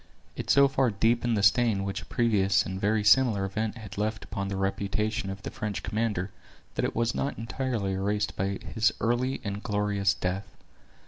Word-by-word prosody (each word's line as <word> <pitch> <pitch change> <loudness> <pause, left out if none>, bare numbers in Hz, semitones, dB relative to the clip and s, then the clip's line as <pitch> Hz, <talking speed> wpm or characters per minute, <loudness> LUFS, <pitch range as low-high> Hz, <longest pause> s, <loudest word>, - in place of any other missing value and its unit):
It - - -6
so 140 0 +6
far 135 -2 +2
deepened 115 +2 +1
the 100 - 0
stain 110 -2 +4
which 100 0 -3
a - - -11
previous 105 -5 +2
and 95 +1 -5
very 105 +1 +2
similar 105 -2 +4
event 110 +4 -2
had 105 -2 -8
left 110 0 -1
upon 100 0 -4
the 100 - -3
reputation 100 +2 -1
of 95 0 -7
the - - -5
French 105 -2 -4
commander 105 -4 -1 0.4
that - - -2
it - - -3
was 115 0 +1
not 140 - -2
entirely 115 -3 -2
erased 105 +2 -1
by 95 +1 -1 0.2
his 110 0 +3
early 120 +3 0
and 100 -1 -4
glorious 105 -3 +1
death. 95 +1 -3
105 Hz, 185 wpm, -28 LUFS, 100-115 Hz, 0.4 s, so